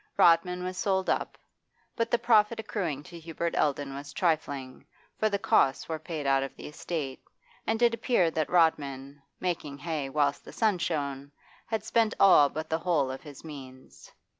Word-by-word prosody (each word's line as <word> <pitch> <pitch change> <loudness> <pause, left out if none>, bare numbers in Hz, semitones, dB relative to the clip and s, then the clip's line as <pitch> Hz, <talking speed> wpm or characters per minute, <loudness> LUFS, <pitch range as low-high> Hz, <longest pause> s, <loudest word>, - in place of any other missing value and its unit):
Rodman 180 +2 +4
was 185 0 -4
sold 190 -2 +1
up; - - -2 0.6
but 230 -1 -1
the 240 - +3
profit 220 -1 +3
accruing 175 -10 -3
to 175 0 -11
Hubert 165 +1 -3
Eldon 145 -1 0
was 145 +1 -8
trifling, 145 -7 -1 0.4
for 215 - +2
the 200 - 0
costs 135 -8 +2
were 160 -1 -3
paid 155 -2 -5
out 135 0 +3
of 135 - -5
the - - -10
estate, 150 -3 -5 0.5
and 225 0 +1
it 235 -1 +5
appeared 210 -8 +1
that 155 -2 -1
Rodman, 145 -5 +1 0.2
making 160 -6 -3
hay 150 -2 -3
whilst 140 0 0
the - - -12
sun 215 -5 +1
shone, 140 -4 -3 0.4
had 220 -2 -2
spent 225 0 +1
all 165 -7 +7
but 155 +2 -5
the 160 +1 -1
whole 155 -7 +1
of 130 - -7
his 145 -3 -12
means. 130 -4 -11
160 Hz, 175 wpm, -28 LUFS, 140-185 Hz, 0.6 s, all